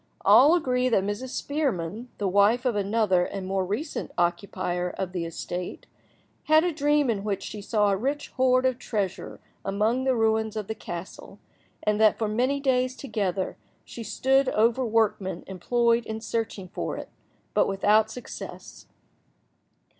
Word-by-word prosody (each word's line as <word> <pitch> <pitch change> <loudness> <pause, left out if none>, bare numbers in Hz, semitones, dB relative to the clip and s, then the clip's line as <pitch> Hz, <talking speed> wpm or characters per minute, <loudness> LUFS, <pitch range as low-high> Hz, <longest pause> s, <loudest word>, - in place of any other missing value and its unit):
All 300 +6 +7
agree 255 -6 +1
that 195 -5 +2
Mrs. 205 +6 -3
Spearman, 245 - -2
the 205 - -1
wife 205 +6 +3
of 245 -4 +1
another 205 -2 +2
and 195 +1 -5
more 190 0 0
recent 215 - -3
occupier 180 0 -1
of 185 0 -4
the 175 -2 -3
estate, 175 +2 -5 0.6
had 310 +1 +5
a 355 -1 0
dream 295 -1 +2
in 200 -3 -3
which 200 -2 -2
she 210 - -6
saw 210 0 +2
a - - +2
rich 275 +8 -2
hoard 255 0 +2
of 255 -1 +1
treasure 205 -7 -3 0.2
among 215 +6 0
the 260 -1 +3
ruins 220 -1 +1
of 215 -2 -3
the 220 - -4
castle, 175 -4 -8 0.5
and 210 0 +1
that 215 -1 +5
for 220 - -1
many 250 +6 +1
days 255 -2 +1
together 200 -8 -2 0.3
she 235 - -9
stood 265 +5 +2
over 230 +4 +2
workmen 220 -4 0
employed 235 +5 +1
in 220 0 -4
searching 220 -4 -3
for 195 - -4
it, - - -7 0.4
but - - +3
without 210 +2 +3
success. 250 +2 -9
220 Hz, 155 wpm, -26 LUFS, 195-255 Hz, 0.6 s, All